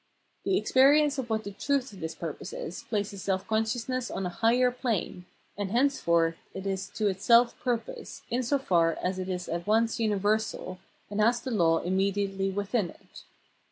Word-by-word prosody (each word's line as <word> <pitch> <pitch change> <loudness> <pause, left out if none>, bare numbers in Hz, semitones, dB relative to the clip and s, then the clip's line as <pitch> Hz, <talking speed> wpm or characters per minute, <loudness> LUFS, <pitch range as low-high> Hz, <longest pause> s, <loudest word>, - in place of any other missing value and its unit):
The 380 - +2
experience 285 0 +4
of 245 -2 -4
what 220 -1 0
the 205 - -6
truth 275 +3 -1
of 195 - -11
this 160 -1 -5
purpose 165 -4 -6
is, 175 - -6
places 205 -2 -2
self 190 0 -1
consciousness 230 +3 -1
on 190 - -3
a - - -1
higher 235 +7 +3
plane, 230 -7 -2 0.3
and 205 -1 -3
henceforth 170 -10 +2 0.2
it 190 - -6
is 195 0 -2
to 215 - +1
itself 235 +5 +4
purpose, 265 - -4
in 245 - +1
so 255 +3 +1
far 170 -10 +2
as 185 +1 -1
it 185 0 -4
is 180 -1 -3
at 170 +3 -4
once 225 +2 +2
universal, 210 -3 0 0.3
and 205 +1 0
has 235 +3 +3
the 255 - -5
law 165 -7 +3
immediately 195 +1 0
within 200 0 -1
it. - - -15
205 Hz, 175 wpm, -28 LUFS, 190-245 Hz, 0.3 s, experience